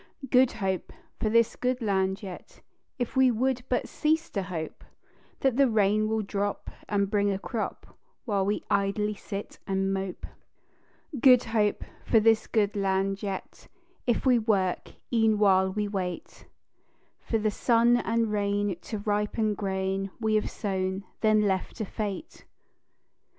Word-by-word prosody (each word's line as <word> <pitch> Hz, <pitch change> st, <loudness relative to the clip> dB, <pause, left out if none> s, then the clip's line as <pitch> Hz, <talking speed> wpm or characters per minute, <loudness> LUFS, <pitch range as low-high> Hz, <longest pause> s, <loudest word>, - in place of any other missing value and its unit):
"Good 255 Hz, 0 st, +5 dB
Hope" 190 Hz, -5 st, -2 dB, 0.3 s
for 215 Hz, -, 0 dB
this 230 Hz, +1 st, +3 dB
good 250 Hz, 0 st, -1 dB
land 195 Hz, -2 st, 0 dB
yet, 185 Hz, -3 st, -10 dB, 0.4 s
If 245 Hz, 0 st, -3 dB
we 260 Hz, -1 st, +5 dB
would 250 Hz, +2 st, 0 dB
but 250 Hz, -, 0 dB
cease 320 Hz, +2 st, 0 dB
to 200 Hz, -, -1 dB
hope 175 Hz, -4 st, -6 dB, 0.6 s
That 265 Hz, -3 st, +2 dB
the 275 Hz, -2 st, +5 dB
rain 215 Hz, 0 st, +2 dB
will 220 Hz, -1 st, 0 dB
drop 200 Hz, 0 st, -3 dB, 0.2 s
and 200 Hz, -1 st, +1 dB
bring 205 Hz, 0 st, +1 dB
a 195 Hz, -, 0 dB
crop 220 Hz, +3 st, -5 dB, 0.3 s
While 200 Hz, -5 st, +1 dB
we 205 Hz, -, -1 dB
idly 205 Hz, +1 st, +1 dB
sit 200 Hz, 0 st, -7 dB
and 195 Hz, 0 st, 0 dB
mope. 190 Hz, -1 st, -4 dB, 0.9 s
"Good 250 Hz, 0 st, +7 dB
Hope" 215 Hz, -2 st, 0 dB, 0.2 s
for 225 Hz, -, +4 dB
this 225 Hz, 0 st, +3 dB
good 210 Hz, -3 st, +1 dB
land 195 Hz, 0 st, 0 dB
yet, 195 Hz, -2 st, -6 dB, 0.4 s
If 240 Hz, -, +1 dB
we 250 Hz, -2 st, +5 dB
work, 200 Hz, -5 st, 0 dB, 0.2 s
e'en 225 Hz, -2 st, +3 dB
while 190 Hz, -2 st, +4 dB
we 210 Hz, +1 st, -1 dB
wait 185 Hz, -3 st, -5 dB, 0.7 s
For 225 Hz, -, -1 dB
the 215 Hz, -1 st, 0 dB
sun 235 Hz, +2 st, +3 dB
and 230 Hz, -2 st, 0 dB
rain 205 Hz, -1 st, 0 dB
to 220 Hz, -, -5 dB
ripen 210 Hz, +1 st, 0 dB
grain 195 Hz, -1 st, -2 dB
We 220 Hz, -1 st, 0 dB
have 215 Hz, -, +1 dB
sown, 190 Hz, -2 st, -2 dB, 0.2 s
then 215 Hz, -1 st, +4 dB
left 190 Hz, -2 st, -1 dB
to 220 Hz, -, -3 dB
fate. 210 Hz, -, -5 dB
210 Hz, 150 wpm, -27 LUFS, 195-225 Hz, 0.9 s, Good